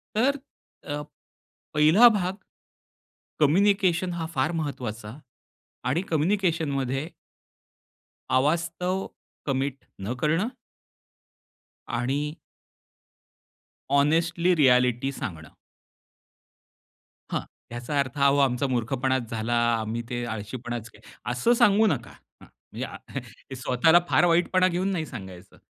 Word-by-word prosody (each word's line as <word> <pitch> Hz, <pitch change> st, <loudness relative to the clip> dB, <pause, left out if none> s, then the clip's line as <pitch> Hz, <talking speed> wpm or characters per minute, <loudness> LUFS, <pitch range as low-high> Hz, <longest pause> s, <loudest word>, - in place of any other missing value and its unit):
तर 275 Hz, +6 st, +2 dB, 0.5 s
अ, 145 Hz, 0 st, -3 dB, 0.7 s
पहिला 155 Hz, +11 st, +7 dB
भाग. 190 Hz, -3 st, -1 dB, 1.0 s
कम्युनिकेशन 185 Hz, +2 st, +3 dB
हा 170 Hz, -1 st, -3 dB
फार 135 Hz, +5 st, +1 dB
महत्वाचा. 120 Hz, -6 st, -5 dB, 0.7 s
आणि 155 Hz, +7 st, +1 dB
कम्युनिकेशनमध्ये 160 Hz, -6 st, 0 dB, 1.3 s
अवास्तव 170 Hz, +6 st, 0 dB, 0.4 s
कमिट 135 Hz, -1 st, -2 dB, 0.2 s
न 100 Hz, +5 st, -2 dB
करणं 165 Hz, +7 st, +2 dB, 1.4 s
आणि 140 Hz, +6 st, -2 dB, 1.6 s
हॉनेस्टली 165 Hz, +5 st, +3 dB
रिएलिटी 125 Hz, -2 st, +3 dB
सांगणं. 80 Hz, -, -6 dB, 1.8 s
हां. -, -, 0 dB, 0.3 s
याचा 120 Hz, +5 st, -2 dB
अर्थ, 140 Hz, 0 st, -2 dB
"अहो 140 Hz, 0 st, +4 dB
आमचा 135 Hz, 0 st, +2 dB
मूर्खपणाच 130 Hz, 0 st, -1 dB
झाला. 115 Hz, +1 st, -2 dB, 0.3 s
आम्ही 110 Hz, +2 st, -3 dB
ते 120 Hz, -1 st, -3 dB
आळशीपणाच 115 Hz, +1 st, -5 dB
के" -, -, -19 dB, 0.3 s
असं 125 Hz, -, +2 dB
सांगू 215 Hz, -1 st, +5 dB
नका. 140 Hz, -, -1 dB, 0.3 s
हं. -, -, -13 dB, 0.3 s
म्हणजे -, -, -5 dB
आ -, -, -9 dB
हं, -, -, -4 dB, 0.3 s
ते 135 Hz, -, -6 dB
स्वतःला 130 Hz, +7 st, +4 dB
फार -, -, +4 dB
वाईटपणा 175 Hz, +2 st, +3 dB
घेऊन 185 Hz, +2 st, -1 dB
नाही 165 Hz, -4 st, -1 dB
सांगायचं, 95 Hz, -9 st, -10 dB
140 Hz, 100 wpm, -26 LUFS, 125-175 Hz, 1.8 s, पहिला